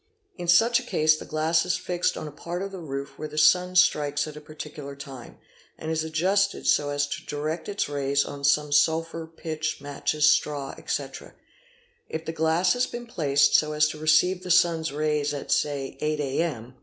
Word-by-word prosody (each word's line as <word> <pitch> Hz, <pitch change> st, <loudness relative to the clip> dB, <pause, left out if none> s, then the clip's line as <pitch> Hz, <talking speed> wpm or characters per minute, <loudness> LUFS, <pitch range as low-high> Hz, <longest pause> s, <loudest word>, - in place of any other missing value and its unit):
In 175 Hz, -1 st, -7 dB
such 225 Hz, +8 st, +5 dB
a -, -, -8 dB
case 155 Hz, -9 st, +3 dB
the -, -, -8 dB
glass 160 Hz, +1 st, +1 dB
is 180 Hz, -, 0 dB
fixed 180 Hz, 0 st, -1 dB
on -, -, -5 dB
a -, -, -7 dB
part 175 Hz, +5 st, -5 dB
of 195 Hz, -, -5 dB
the 190 Hz, -, -7 dB
roof 140 Hz, -4 st, -6 dB
where 155 Hz, -, -4 dB
the 150 Hz, 0 st, -10 dB
sun 180 Hz, +4 st, +4 dB
strikes 145 Hz, -5 st, +3 dB
at 150 Hz, -, -8 dB
a 150 Hz, -, -9 dB
particular 150 Hz, -2 st, -9 dB
time, 135 Hz, -3 st, -10 dB, 0.4 s
and 160 Hz, -, -5 dB
is 160 Hz, -1 st, 0 dB
adjusted 190 Hz, +5 st, 0 dB
so 145 Hz, -1 st, +3 dB
as 145 Hz, 0 st, 0 dB
to 145 Hz, -, -6 dB
direct 155 Hz, +4 st, -3 dB
its 205 Hz, -, -1 dB
rays 140 Hz, -1 st, 0 dB
on 140 Hz, 0 st, -8 dB
some 145 Hz, +1 st, +2 dB
sulphur, 165 Hz, +2 st, +1 dB
pitch, 160 Hz, -1 st, -4 dB
matches, 145 Hz, +1 st, 0 dB
straw, 150 Hz, -2 st, +1 dB
etc. -, -, -5 dB, 0.7 s
If 160 Hz, 0 st, -5 dB
the 160 Hz, -, -4 dB
glass 160 Hz, +3 st, +2 dB
has 250 Hz, 0 st, 0 dB
been 240 Hz, 0 st, -7 dB
placed 145 Hz, -10 st, +2 dB
so 150 Hz, 0 st, +3 dB
as 150 Hz, 0 st, +3 dB
to 155 Hz, -, -7 dB
receive 155 Hz, +4 st, +3 dB
the 185 Hz, -, -8 dB
sun's 170 Hz, -3 st, +3 dB
rays 150 Hz, 0 st, -1 dB
at 140 Hz, -, -6 dB
say 140 Hz, -2 st, 0 dB
8 150 Hz, 0 st, -1 dB
a.m. 135 Hz, -4 st, -2 dB
155 Hz, 195 wpm, -25 LUFS, 145-170 Hz, 0.7 s, such